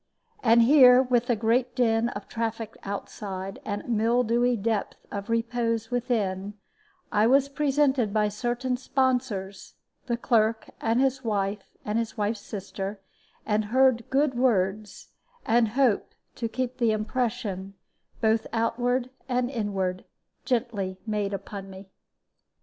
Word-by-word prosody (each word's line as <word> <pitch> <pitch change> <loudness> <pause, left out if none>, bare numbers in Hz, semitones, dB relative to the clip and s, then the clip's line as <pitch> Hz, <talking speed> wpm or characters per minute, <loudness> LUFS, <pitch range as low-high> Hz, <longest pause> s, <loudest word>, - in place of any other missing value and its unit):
And 230 0 +5
here, 255 -1 +7
with 245 -1 +1
a 240 - +4
great 235 +3 +1
din 230 -2 +2
of 205 -3 -7
traffic 225 -1 -4
outside, 195 -1 -5
and 205 -1 -4
a - - -15
mildewy 240 +1 +2
depth 215 0 -1
of 200 +2 -5
repose 230 0 -1
within, 210 -5 -1 0.6
I 210 +1 +3
was 275 +2 +4
presented 275 -5 +1
by 210 0 +2
certain 245 +4 -2
sponsors 250 -7 -1 0.3
(the 235 -1 0
clerk 225 -2 +1
and 225 +2 +1
his 265 0 +1
wife 205 -2 -2
and 210 +2 0
his 230 -1 -4
wife's 210 0 -1
sister), 195 0 -6 0.5
and 210 0 +1
heard 250 0 +3
good 275 0 +2
words, 210 -4 0 0.4
and 230 0 +3
hope 255 -7 +2 0.2
to 230 -2 -3
keep 255 +1 -3
the 235 -2 +3
impression, 215 -3 -2 0.5
both 220 0 +2
outward 245 +2 0 0.2
and 250 0 0
inward, 195 -6 -2 0.4
gently 230 -7 -1
made 210 -2 -1
upon 195 0 -6
me. 190 0 -12
230 Hz, 130 wpm, -26 LUFS, 205-245 Hz, 0.6 s, here